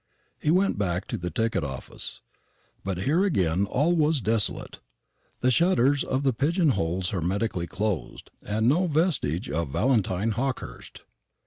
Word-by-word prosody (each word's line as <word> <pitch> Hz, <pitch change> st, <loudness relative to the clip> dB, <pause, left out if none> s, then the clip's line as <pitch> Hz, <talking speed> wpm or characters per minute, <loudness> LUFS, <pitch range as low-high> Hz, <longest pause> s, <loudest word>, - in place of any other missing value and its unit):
He -, -, -1 dB
went 185 Hz, -, +2 dB
back 90 Hz, -1 st, -1 dB
to -, -, -2 dB
the 90 Hz, 0 st, -3 dB
ticket 110 Hz, 0 st, 0 dB
office; 70 Hz, -2 st, -5 dB, 0.6 s
but 95 Hz, -1 st, -3 dB
here 160 Hz, -, +2 dB
again 95 Hz, -, +1 dB
all 150 Hz, -, +2 dB
was 155 Hz, -2 st, +2 dB
desolate, 110 Hz, -2 st, +1 dB, 0.6 s
the 130 Hz, -, +3 dB
shutters 145 Hz, -3 st, +3 dB
of 130 Hz, +1 st, -1 dB
the 135 Hz, -2 st, +2 dB
pigeon 160 Hz, -, +2 dB
holes 90 Hz, -5 st, -1 dB
hermetically 95 Hz, 0 st, -1 dB
closed, 100 Hz, -2 st, -3 dB
and 110 Hz, +2 st, 0 dB
no 175 Hz, +8 st, +3 dB
vestige 150 Hz, -, 0 dB
of 80 Hz, +2 st, -2 dB
Valentine 105 Hz, -, +1 dB
Hawkehurst. 130 Hz, +4 st, -4 dB
115 Hz, 140 wpm, -26 LUFS, 90-145 Hz, 0.6 s, the